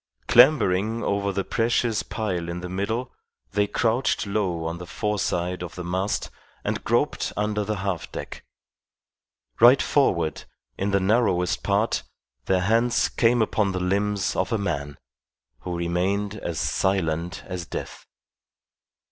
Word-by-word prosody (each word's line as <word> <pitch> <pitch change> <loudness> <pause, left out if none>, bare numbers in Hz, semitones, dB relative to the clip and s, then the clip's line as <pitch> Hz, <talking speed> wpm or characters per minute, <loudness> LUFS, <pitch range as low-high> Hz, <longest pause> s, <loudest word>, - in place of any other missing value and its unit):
Clambering 115 -5 +4
over 100 0 0
the 95 0 -1
precious 115 0 +1
pile 90 -6 -3
in 85 +1 -4
the 90 - -6
middle, 110 +7 -2 0.4
they 105 +1 +1
crouched 115 +4 +1
low 95 -5 -1
on 85 +1 -3
the 90 - -8
foreside 90 -3 -1
of 90 -1 -6
the 90 - -5
mast 95 +3 -2 0.3
and - - -2
groped - - 0
under 105 0 0
the 105 +1 -2
half 95 -4 -3
deck. - - -7 1.2
Right 125 +3 +8
forward, 85 - +1 0.3
in 100 - -1
the 100 0 +2
narrowest 95 -3 +2
part, 100 +3 +1 0.4
their 95 -1 +2
hands 115 +5 +2
came 120 -1 +3
upon 105 -2 0
the 95 - -1
limbs 100 +2 0
of 95 0 -1
a 115 - +2
man, 75 -8 -3 0.6
who 90 +3 -4
remained 95 +4 0
as 85 -5 -4
silent 90 -2 0
as 90 -3 -5
death. - - -7
100 Hz, 140 wpm, -25 LUFS, 90-110 Hz, 1.2 s, Right